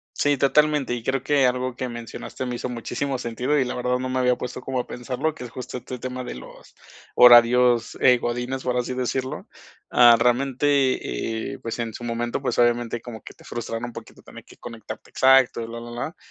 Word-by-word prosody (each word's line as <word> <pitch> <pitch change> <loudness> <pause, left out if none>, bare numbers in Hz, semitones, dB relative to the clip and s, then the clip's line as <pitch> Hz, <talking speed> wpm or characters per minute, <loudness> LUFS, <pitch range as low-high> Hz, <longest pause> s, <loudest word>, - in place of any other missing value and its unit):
Sí, 145 0 +2
totalmente, 145 -1 +2
y 120 -2 -6
creo 135 0 -1
que 140 -1 +3
algo 125 0 -1
que 130 - -3
mencionaste 120 +2 -7
me 125 -1 -3
hizo 125 - -4
muchísimo 125 +3 -3
sentido 125 +4 -1
y 135 - +3
la 125 - -4
verdad, 125 0 0
no 130 - -3
me 130 0 -1
había 125 -1 +3
puesto 125 0 -6
como 130 0 -3
a - - -5
pensarlo, 125 +5 -3
que 135 - -9
es 120 - -9
justo 125 +1 -7
este 125 0 -8
tema 130 0 -5
de - - -6
los 60 - -13 0.4
horarios, 120 0 +6
eh, 125 -1 +5
Godínez, 125 +2 -3
por 125 -1 -1
así 125 +1 -2
decirlo. 130 +1 -3 0.4
Ah, 120 -1 +7
realmente, 130 - 0
eh, - - -11
pues, 115 +1 -5
en 115 -2 -4
su - - -8
momento, 120 +2 -3
pues, 135 - -2
obviamente 120 -1 +1
como 115 -1 -10
que - - -11
te - - -20
frustran 115 0 -5
un 120 - -6
poquito - - -11
tener - - -13
que - - -17
conectarte 115 -3 -9
exacto 130 -2 +4
y - - -5
bla, 115 +1 -8
bla, 120 0 -9
bla, 120 +7 -5
125 Hz, 215 wpm, -23 LUFS, 120-130 Hz, 0.4 s, Ah